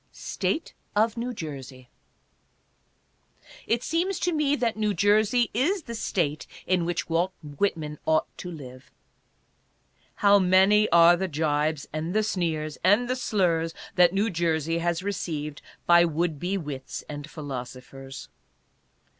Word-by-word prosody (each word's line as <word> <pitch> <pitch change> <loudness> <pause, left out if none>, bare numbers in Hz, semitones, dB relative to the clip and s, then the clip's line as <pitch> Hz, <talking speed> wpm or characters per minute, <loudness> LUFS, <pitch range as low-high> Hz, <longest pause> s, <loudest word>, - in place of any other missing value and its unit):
STATE 315 - -3 0.2
OF 220 +1 +2
NEW 240 +1 -3
JERSEY. 135 - -8 1.8
It 235 +2 +1
seems 350 +3 -1
to 355 - +1
me 295 -2 +2
that 235 -5 0
New 210 -2 0
Jersey 215 +5 +3
is 325 - +1
the 235 - -7
State 165 -9 -2 0.2
in 180 -2 +1
which 175 0 -2
Walt 175 +3 0
Whitman 150 0 -2
ought 160 0 +3
to 180 - -6
live. 130 -6 -10 1.3
How 205 0 +5
many 190 +3 +4
are 170 0 +7
the 190 +2 -2
jibes, 150 -1 -1
and 160 +4 -3
the 215 - +3
sneers, 160 -7 -2
and 205 +7 +4
the 255 - 0
slurs 170 -9 0 0.2
that 180 -1 +5
New 200 +4 0
Jersey 165 -1 0
has 170 +1 -1
received 155 -7 -4 0.2
by 170 0 +6
would 165 -2 -1
be 185 +5 -1
wits 145 -6 -6
and 145 0 -7
philosophers 135 -2 -8
175 Hz, 135 wpm, -26 LUFS, 155-210 Hz, 1.8 s, are